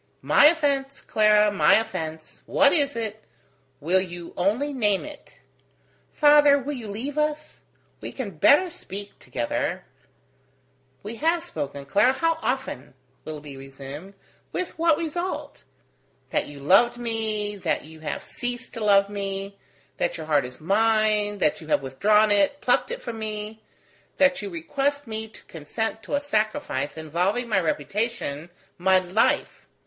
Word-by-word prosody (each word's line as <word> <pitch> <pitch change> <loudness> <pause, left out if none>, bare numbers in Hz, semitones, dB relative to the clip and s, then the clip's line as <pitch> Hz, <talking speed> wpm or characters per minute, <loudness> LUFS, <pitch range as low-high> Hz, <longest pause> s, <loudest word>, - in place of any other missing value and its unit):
"My - - +5
offence, 280 -4 +1
Clara, 210 -1 +3
my 205 - +5
offence! 160 -8 -3
What 285 0 +4
is 285 -4 +1
it? 220 -2 -4 0.6
Will 180 +5 +2
you 175 -2 -8
only 230 +11 0
name 210 -5 +1
it?" 300 -1 -12 0.8
"Father, 295 -1 +6
will 285 +2 -4
you 240 -5 -7
leave 260 +9 -4
us? 300 0 -2 0.4
We - - -7
can 245 -7 -5
better 345 - +5
speak 205 - -8
together.. - - -3 0.6
." - - -40
"We 220 +3 -7
have 330 +4 +1
spoken, 140 - -5
Clara, 205 - +3
how 330 +3 0
often!" 250 - -3 0.3
Willoughby 150 -2 -7
resumed, 135 +7 -10 0.4
"with 365 -3 -4
what 330 -2 +4
result? 340 +3 -4 0.7
that - - 0
you 145 -1 -10
loved 200 +11 +4
me, 220 -3 -2
that 190 - -1
you 160 +1 -13
have 155 -1 -4
ceased 245 +1 -5
to 230 -3 -4
love 200 -1 +5
me: 200 0 -5 0.4
that - - -1
your 160 - -6
heart 150 -4 +2
was 125 0 -10
mine, 210 +3 +2
that 155 -5 +1
you 155 - -11
have 145 - +1
withdrawn 210 +11 +3
it, 205 +8 +3
plucked - - +2
it - - -5
from 235 -2 -6
me: 215 0 -5 0.6
that 275 -2 +3
you 205 - -5
request 275 - -2
me 220 -1 -5
to 220 - -16
consent 220 +8 -4
to 255 - -3
a - - +2
sacrifice 215 - -2
involving 180 +10 -1
my 210 -4 +2
reputation, 170 -1 -2 0.3
my 190 +1 +4
life. 185 +4 0
215 Hz, 150 wpm, -25 LUFS, 180-270 Hz, 0.8 s, Father